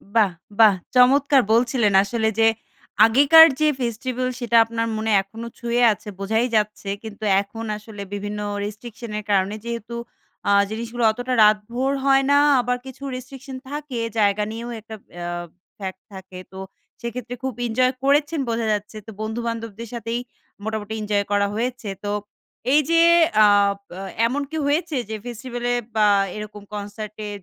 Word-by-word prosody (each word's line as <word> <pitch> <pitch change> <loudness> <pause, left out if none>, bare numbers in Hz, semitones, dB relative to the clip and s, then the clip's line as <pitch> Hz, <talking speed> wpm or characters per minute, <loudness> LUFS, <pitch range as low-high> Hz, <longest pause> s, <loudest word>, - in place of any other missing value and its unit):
বাহ, 210 -4 +4 0.3
বাহ! 215 -2 +8 0.2
চমৎকার 270 +2 +5
বলছিলেন 235 -2 +2
আসলে। 220 +2 -1
যে, 225 - +6 0.6
আগেকার 280 +8 +8
যে, 310 - +3
ফেস্টিভাল 250 +2 -2
সেটা 235 -1 +2
আপনার 230 0 -2
মনে 220 0 -1
এখনো 225 +4 -9
ছুঁয়ে 235 0 0
আছে 210 - -15
বোঝাই 220 +4 +1
যাচ্ছে। 210 -1 -1
কিন্তু 220 -1 -9 0.2
এখন 225 +3 -8
আসলে 210 -1 -10
বিভিন্ন 205 +1 -4 0.2
রেস্ট্রিকশন 215 +2 -7
এর - - -8
কারণে 195 +1 +2
যেহেতু 235 0 -5 0.5
আ - - +4 0.2
জিনিসগুলো 230 +2 -4
অতটা 245 +3 -4
রাতভর 230 +5 +2
হয় 270 0 +5
না, 285 - +5 0.3
আবার 250 +1 -1
কিছু 265 +1 -10
রেস্ট্রিকশন 265 +1 -9
থাকে 290 -3 -5 0.2
জায়গা 205 0 +2
নিয়েও 235 +2 -6
একটা 220 +1 -10 0.2
অ্যা 175 0 -5 0.5
ফ্যাক্ট 190 -1 -6
থাকে। 190 -1 -10 0.2
তো - - -9 0.4
সেক্ষেত্রে 235 0 -5
খুব 265 -1 -2
ইনজয় 255 +3 +2
করেছেন 290 +3 +2
বোঝা 230 0 -1
যাচ্ছে। 210 +1 -5
তো - - -7
বন্ধু-বান্ধবদের 230 0 -4
সাথেই 235 0 -3 0.4
মোটামুটি 220 -1 -4
এনজয় 205 -1 0
করা 200 0 +2
হয়েছে। 240 -1 -3
তো 205 - -3 0.6
এই 295 - +7
যে, 335 - +4 0.5
আ - - +8 0.4
প - - -64 0.4
এমন 270 +5 -2
কি 320 - -3
হয়েছে 315 +2 0
যে, 220 - -3
ফেস্টিভালে 245 0 -4 0.2
বা 215 -1 +4 0.3
এরকম 210 -1 -8
কনসার্ট 210 +1 -6
এ - - -5
230 Hz, 150 wpm, -22 LUFS, 210-250 Hz, 0.6 s, বাহ